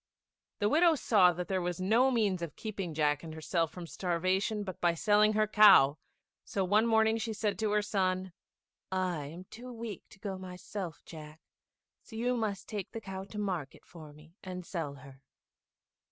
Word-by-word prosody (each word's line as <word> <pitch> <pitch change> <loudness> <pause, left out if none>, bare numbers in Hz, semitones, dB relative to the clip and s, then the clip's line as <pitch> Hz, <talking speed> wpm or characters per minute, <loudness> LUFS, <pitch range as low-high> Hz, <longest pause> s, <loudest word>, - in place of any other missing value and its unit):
The 205 - +1
widow 325 +7 +4
saw 200 -9 +4
that 175 +1 -5
there 190 -1 0
was 175 0 -3
no 225 +8 +3
means 210 -8 +1
of 170 -3 -5
keeping 195 -7 -5
Jack 150 -1 +1
and 160 -1 -8
herself 165 +1 -1
from 180 -2 -8
starvation 185 +5 -1
but 185 -3 -7
by 170 -1 +3
selling 210 +4 +4
her 215 0 +3
cow; 195 -9 +7 0.4
so 195 -2 -2
one 210 +5 +3
morning 220 0 +3
she 225 0 -3
said 210 0 -2
to 220 -1 0
her 210 0 +2
son, 185 -3 -1 0.6
"I 180 -5 -1
am 170 +5 -9
too 240 +6 -11
weak 225 -4 -6
to - - -16
go 195 -2 -5
myself, 180 -2 -7
Jack, 155 -1 -11 0.6
so 220 - -13
you 245 +2 0
must 205 -5 -3
take 205 -4 -5
the 225 - -5
cow 190 -2 -6
to 210 - -10
market 185 -9 -4
for 155 -4 -12
me, 155 +2 -17
and 180 -2 -6
sell 160 -6 -4
her." 135 0 -14
190 Hz, 180 wpm, -31 LUFS, 170-215 Hz, 0.6 s, cow